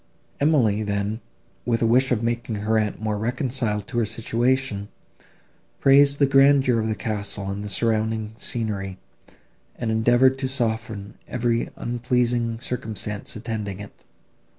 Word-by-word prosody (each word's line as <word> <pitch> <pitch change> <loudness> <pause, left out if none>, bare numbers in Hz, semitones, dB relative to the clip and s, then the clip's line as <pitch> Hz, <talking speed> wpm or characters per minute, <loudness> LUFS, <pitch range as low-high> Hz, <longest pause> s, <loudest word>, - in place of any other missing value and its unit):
Emily, 125 -9 +3
then, 105 +2 -2 0.4
with 115 -1 0
a - - +4
wish 125 +4 +3
of 120 -2 +1
making 115 -1 -1
her 105 +2 0
aunt 105 -1 -2
more 105 -1 -2
reconciled 120 -3 -1
to 120 - -2
her 115 - +2
situation, 115 -1 0 0.9
praised 140 +1 +5
the 140 - +4
grandeur 135 -3 +5
of 110 - -1
the 110 - -1
castle 100 -1 -3
and 100 +1 -4
the 105 - -5
surrounding 110 +1 0
scenery, 105 -5 -3 0.8
and 115 -2 -2
endeavoured 120 +4 +4
to 135 - -1
soften 110 -5 -3
every 115 -1 0
unpleasing 120 -1 0
circumstance 110 -4 -4
attending 105 -3 -4
it. 100 -1 -11
115 Hz, 135 wpm, -24 LUFS, 105-125 Hz, 0.9 s, praised